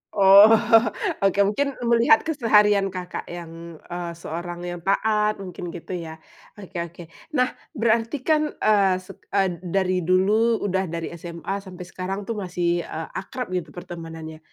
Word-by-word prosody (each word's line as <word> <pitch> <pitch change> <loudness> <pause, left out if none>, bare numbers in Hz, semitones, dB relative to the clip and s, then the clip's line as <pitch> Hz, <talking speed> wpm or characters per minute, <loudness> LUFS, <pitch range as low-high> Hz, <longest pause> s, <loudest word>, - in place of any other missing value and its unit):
Oh. 200 +1 +9 0.7
Oke, 195 0 +2
mungkin 275 +7 0
melihat 235 +6 +4
keseharian 210 -9 +3
Kakak 180 -1 -6
yang, 170 -1 -9
eee, 175 -1 -5
seorang 175 +1 -6
yang 175 0 -5
taat 210 +3 +1
mungkin, 180 -2 -7
gitu, 175 - -9
ya. 160 -1 -7 0.4
Oke 190 -3 -8
oke. 170 +1 -6 0.3
Nah, 255 -1 +2 0.2
berarti, 230 +4 0
kan, 305 -1 +1
eee, 200 -3 +3
set 195 +1 -13 0.2
eee, 185 -4 +1
dari 185 0 0
dulu, 215 +5 +3
udah 190 -1 0
dari 165 0 -5
SMA 170 +3 -5
sampai 185 -2 -10
sekarang, 190 +3 -5
tuh, 225 0 -4
masih, 175 -2 -1
eee, 160 0 -5
akrab, 245 +2 -6
gitu, 180 -4 -3
pertemanannya. 165 -2 -8
190 Hz, 145 wpm, -23 LUFS, 175-210 Hz, 0.7 s, Oh